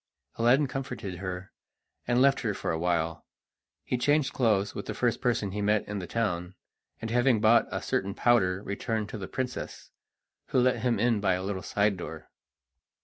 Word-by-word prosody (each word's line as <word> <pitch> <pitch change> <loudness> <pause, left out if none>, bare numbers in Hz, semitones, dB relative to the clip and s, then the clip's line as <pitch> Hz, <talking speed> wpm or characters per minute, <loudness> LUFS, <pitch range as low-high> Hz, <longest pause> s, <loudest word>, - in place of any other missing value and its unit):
Aladdin 125 +5 +4
comforted 125 -8 -5
her, 95 0 -5 0.6
and 120 0 +3
left 140 0 +4
her 110 -4 -1
for - - -2
a 80 - -2
while. 85 -1 -1 0.6
He 125 - -2
changed 145 +2 +2
clothes 105 -5 +2
with 100 - -6
the - - -4
first 120 -2 0
person 115 -6 0
he 105 +2 -3
met 105 0 +1
in 105 0 -3
the 90 - -6
town, 90 -5 -2 0.4
and 115 - -5
having 120 -1 +3
bought 115 +2 +5
a - - -4
certain 100 +1 -1
powder 100 -6 +2
returned 110 +1 -3
to 110 - -6
the 95 - -5
princess, 130 -2 -5 0.6
who - - +2
let 125 0 +3
him 120 -2 +1
in 115 -1 +2
by 95 -3 +2
a 90 - -4
little 95 -1 -3
side 100 0 +1
door. 80 -2 -8
105 Hz, 185 wpm, -28 LUFS, 95-120 Hz, 0.6 s, bought